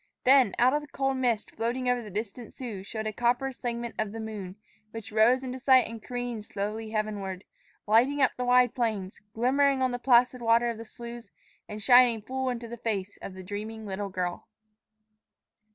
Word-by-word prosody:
Then 255 -5 +5
out 255 +2 +4
of 295 - +1
the 295 - -11
cold 270 -2 -1
mist 240 -4 0
floating 245 +3 -2
over 250 -1 +2
the 215 - -9
distant 215 +3 -6
Sioux 230 -7 -6
showed 220 +2 -5
a 215 - -2
copper 245 +4 +1
segment 235 -2 -4
of 215 -2 -1
the 225 - -6
moon, 210 -4 -6 0.3
which 225 -1 -8
rose 230 +5 +4
into 255 0 -5
sight 260 -1 +5
and 225 0 -8
careened 245 -2 -4
slowly 210 +2 -4
heavenward, 205 -3 -3 0.4
lighting 240 +7 +3
up 265 -3 +4
the 250 - -3
wide 250 -1 +4
plains, 215 -6 -2
glimmering 270 +4 +3
on 255 - +1
the 245 - -3
placid 245 0 +4
water 235 +1 +3
of 225 - -8
the 230 - -7
sloughs, 235 +1 -9 0.4
and 210 0 -6
shining 245 -2 +6
full 260 +3 -2
into 240 -1 -4
the 235 +1 -7
face 205 -4 -3
of 185 - -7
the 190 - -9
dreaming 215 +3 -6
little 200 0 -4
girl. 180 -2 -4
235 Hz, 190 wpm, -28 LUFS, 215-250 Hz, 0.4 s, shining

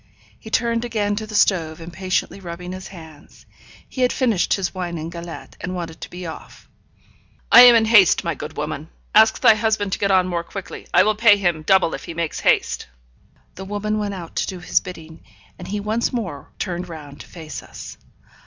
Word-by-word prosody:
He - - -11
turned 230 +1 0
again 210 -4 -1
to 215 0 -4
the 215 - -7
stove, 165 -6 +2
impatiently 185 +4 -3
rubbing 180 0 -7
his 185 0 -7
hands. 160 -5 -14 0.4
He 260 - -6
had 250 - +3
finished 230 -9 +1
his 195 -2 -3
wine 175 -2 -4
and 160 +1 -6
galette, 170 0 -9
and 185 0 -4
wanted 165 -2 -6
to - - -7
be 180 0 -8
off. 160 - -10 0.8
'I - - +11
am 245 -1 +9
in 225 -1 +4
haste, 210 -5 +5
my - - -1
good - - -8
woman. - - -4 0.2
Ask - - +5
thy - - +7
husband 215 -2 0
to - - -2
get 200 - +1
on 185 -1 +3
more 170 -2 -2
quickly. 195 +2 -8
I - - +6
will 215 - +2
pay 210 -1 +5
him 175 -5 0
double 190 +1 +3
if - - -6
he 165 - -7
makes 165 -2 -3
haste.' - - +1 0.7
The 190 - -8
woman 210 +2 -2
went 205 -1 -3
out 170 -3 -9
to - - 0
do 185 - -5
his 175 - +1
bidding; 160 -3 -11 0.4
and 180 - -8
he 205 +2 -3
once 215 +3 -1
more 185 - -5
turned 180 -2 -4
round 150 -3 -10
to - - -13
face 160 -3 -8
us. - - -10
185 Hz, 205 wpm, -21 LUFS, 170-210 Hz, 0.8 s, I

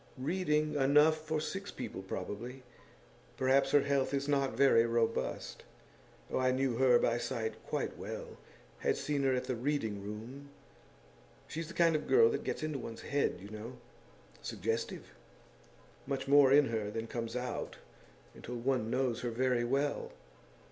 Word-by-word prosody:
'Reading 150 +1 0
enough 150 +3 +4
for 155 0 0
six 195 +6 -4
people, - - -6
probably. 105 +7 -6 0.7
Perhaps 135 +1 +3
her 145 - +5
health 140 -1 +1
is 140 +1 -2
not 140 -2 +1
very 135 -4 +6
robust. 115 -1 -1 0.7
Oh, - - 0
I 130 0 +3
knew 130 -2 +1
her 130 -2 +6
by 120 0 +1
sight 115 -1 -3
quite - - -3
well - - -7 0.4
had - - +1
seen 145 -1 -1
her 135 -1 +2
at 125 - -1
the 125 0 -2
Reading 115 -6 -2
room. 115 +7 -8 1.0
She's 165 +1 -5
the 165 - -10
kind 165 -2 +4
of 155 - -2
girl 455 +2 +6
that - - -2
gets - - -3
into 155 -3 -2
one's 115 -1 -7
head, 140 0 0
you 100 - -9
know 110 +4 -8 0.6
suggestive; 115 +3 -3 0.9
much 135 -1 -2
more 140 -1 +6
in 145 -1 +6
her 110 -2 -2
than 115 +2 -4
comes 115 0 -4
out 125 -1 -4 0.6
until 125 - -7
one 120 -2 0
knows 125 -1 0
her 120 - -1
very 125 +1 +1
well. 140 +4 -1
130 Hz, 155 wpm, -33 LUFS, 115-145 Hz, 1.0 s, very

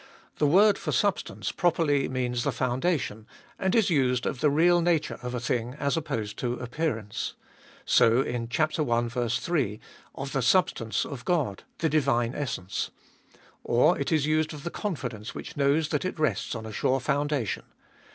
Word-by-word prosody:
The 150 - +4
word 200 +6 +5
for - - -3
substance 205 -2 0
properly 160 -6 +1
means 125 -2 -1
the 140 - +1
foundation, 125 -3 -1 0.3
and 190 +2 +1
is 220 -5 +3
used 125 -5 +2
of 130 - -2
the 150 - +3
real 170 +4 +4
nature 170 -2 +1
of 125 0 -4
a - - -1
thing 120 +1 -2
as 140 -1 0
opposed 115 -10 -3
to 120 -1 -1
appearance. 120 -4 -3 0.5
So, 115 +4 +5
in 120 -2 -3
chap. 155 +5 +1
i. 120 -3 0
3, 120 - -1 0.4
of 135 0 -5
the 135 - 0
substance 120 -5 +2
of 130 -5 -7
God, 145 - -1
the 165 - +1
divine 135 -6 +2
essence. 110 -11 -3 0.7
Or 140 +9 +4
it 140 - -2
is 155 -3 +2
used 155 0 +1
of 145 - -10
the 170 - -4
confidence 125 - -4
which - - -7
knows 145 +2 +2
that 150 - 0
it 185 - -3
rests 155 -4 0
on 110 -1 -6
a 110 - -7
sure 130 +4 +1
foundation. 140 -3 -1
135 Hz, 170 wpm, -27 LUFS, 120-155 Hz, 0.7 s, word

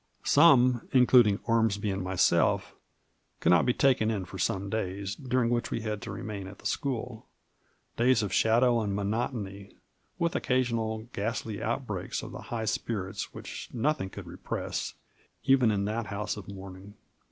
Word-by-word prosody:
Some, 125 -2 +5
including 125 -5 +6
Ormsby 110 -3 +1
and 95 0 -2
myself, 95 -1 +2 0.7
could - - +3
not 90 +7 +4
be 125 - +4
taken 125 -5 +3
in 100 -4 -2
for 95 +1 -9
some 95 +2 0
days, 100 -1 -3
during 125 -1 0
which 120 -1 0
we - - -2
had 105 -2 -3
to - - -6
remain 100 -3 -6
at 100 +1 -10
the - - -19
school: 125 -4 -3 0.7
days 120 -1 +3
of 100 - -3
shadow 120 +1 +4
and 100 -2 -2
monotony, 100 -1 -3 0.4
with 170 -1 0
occa 130 0 +1
sional 115 -1 -3
ghastly 110 0 -3
outbreaks 110 -5 -3
of - - -7
the - - -8
high 115 -2 -2
spirits 105 -3 -3
which - - -8
noth 140 +4 0
ing 95 - -4
could - - -9
repress, - - -4 0.5
even 135 -3 +4
in 100 -2 0
that 110 +1 -2
house 100 +1 -3
of 105 -3 -9
mourning. 95 +1 -10
110 Hz, 165 wpm, -29 LUFS, 100-120 Hz, 0.7 s, including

